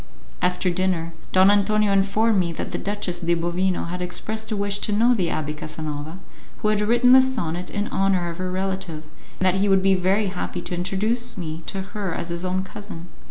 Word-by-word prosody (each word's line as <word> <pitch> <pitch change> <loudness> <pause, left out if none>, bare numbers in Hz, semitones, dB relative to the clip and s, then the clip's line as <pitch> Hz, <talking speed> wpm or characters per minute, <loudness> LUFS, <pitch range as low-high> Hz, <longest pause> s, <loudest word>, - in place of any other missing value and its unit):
After 180 0 +1
dinner, 175 -2 0 0.2
Don 190 +1 +6
Antonio 205 0 +3
informed 200 +2 +3
me 170 -2 0
that - - -5
the - - -2
Duchess 200 -3 -2
de 170 0 +1
Bovino 175 +2 0
had 180 +1 -4
expressed 220 +5 -3
a 215 - 0
wish 200 0 -1
to 210 - -1
know 230 +4 +4
the 190 -7 +1
Abbé 155 -2 -2
Casanova 155 +1 -5 0.5
who 210 - +3
had 210 -1 +2
written 240 +4 +4
the 260 +1 +9
sonnet 180 -10 -2
in 205 0 -2
honour 190 -2 +1
of 170 - -9
her 185 0 -2
relative, 190 -4 -3 0.4
and 185 - +1
that 185 - +4
he 200 - +2
would 190 -1 +4
be 195 0 +5
very 190 +3 +2
happy 180 -1 -4
to - - -5
introduce 215 +7 -1
me 160 -2 -5
to 195 - -3
her 200 -5 -2
as 170 - -4
his 170 +1 -3
own 185 +1 -1
cousin. 190 -3 -9
190 Hz, 205 wpm, -23 LUFS, 175-205 Hz, 0.5 s, the